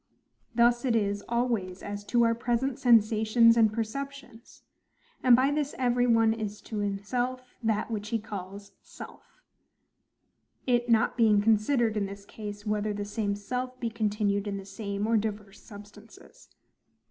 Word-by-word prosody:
Thus 240 Hz, 0 st, +3 dB
it 245 Hz, -3 st, +1 dB
is 205 Hz, -2 st, 0 dB
always 230 Hz, -6 st, -1 dB
as 205 Hz, 0 st, -6 dB
to 235 Hz, +2 st, +2 dB
our 230 Hz, 0 st, +3 dB
present 240 Hz, +2 st, -1 dB
sensations 230 Hz, 0 st, +4 dB
and 225 Hz, -2 st, +4 dB
perceptions: 235 Hz, +2 st, -7 dB, 0.6 s
and 250 Hz, -2 st, +7 dB
by 260 Hz, +3 st, +2 dB
this 295 Hz, -1 st, -2 dB
every 245 Hz, -1 st, +1 dB
one 225 Hz, -1 st, +4 dB
is 215 Hz, -2 st, -5 dB
to 215 Hz, -, -6 dB
himself 245 Hz, +6 st, -3 dB
that 220 Hz, 0 st, -1 dB
which 210 Hz, -1 st, -4 dB
he 230 Hz, -, 0 dB
calls 200 Hz, -2 st, -8 dB
SELF:—it 240 Hz, -1 st, -8 dB
not 230 Hz, 0 st, +2 dB
being 220 Hz, -3 st, +4 dB
considered, 220 Hz, +2 st, +2 dB
in 205 Hz, -2 st, -1 dB
this 200 Hz, 0 st, -10 dB
case, 205 Hz, -1 st, -8 dB
whether 210 Hz, 0 st, -1 dB
the 205 Hz, 0 st, -4 dB
same 205 Hz, -1 st, -2 dB
self 250 Hz, +5 st, -5 dB
be 230 Hz, -2 st, -3 dB
continued 210 Hz, -2 st, -1 dB
in 200 Hz, -1 st, -3 dB
the 195 Hz, -, -8 dB
same 200 Hz, +1 st, -4 dB
or 225 Hz, 0 st, +2 dB
divers 210 Hz, -2 st, -4 dB
substances. 210 Hz, -, -15 dB
220 Hz, 145 wpm, -28 LUFS, 205-240 Hz, 0.6 s, and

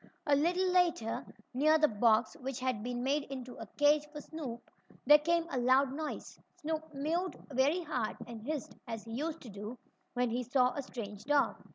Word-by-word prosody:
A 290 Hz, -2 st, +4 dB
little 355 Hz, +5 st, +2 dB
later, 345 Hz, -11 st, +2 dB, 0.3 s
near 305 Hz, +5 st, +5 dB
the 305 Hz, -1 st, +5 dB
box 220 Hz, -1 st, +3 dB
which 265 Hz, 0 st, -4 dB
had 255 Hz, -4 st, -1 dB
been 245 Hz, +1 st, -3 dB
made 280 Hz, +2 st, +1 dB
into 255 Hz, -2 st, -7 dB
a 225 Hz, -, -7 dB
cage 295 Hz, 0 st, +4 dB
for 300 Hz, -, -7 dB
Snoop, 285 Hz, -7 st, -7 dB, 0.4 s
there 295 Hz, +3 st, +9 dB
came 335 Hz, +2 st, +1 dB
a 260 Hz, -, 0 dB
loud 260 Hz, +2 st, +4 dB
noise. 310 Hz, +1 st, -5 dB, 0.2 s
Snoop 315 Hz, +1 st, -4 dB
meowed 320 Hz, +5 st, -1 dB, 0.2 s
very 285 Hz, +7 st, +2 dB
hard, 245 Hz, -8 st, -2 dB
and 235 Hz, -2 st, -8 dB
hissed 290 Hz, +3 st, -4 dB
as 225 Hz, -2 st, -5 dB
he 225 Hz, -, -10 dB
used 310 Hz, +7 st, -3 dB
to 245 Hz, -, -10 dB
do 210 Hz, +4 st, -7 dB, 0.4 s
when 245 Hz, -1 st, +1 dB
he 245 Hz, +2 st, 0 dB
saw 250 Hz, +1 st, +2 dB
a 285 Hz, -, -3 dB
strange 210 Hz, -6 st, -7 dB
dog. 290 Hz, 0 st, +2 dB
270 Hz, 190 wpm, -33 LUFS, 245-305 Hz, 0.4 s, there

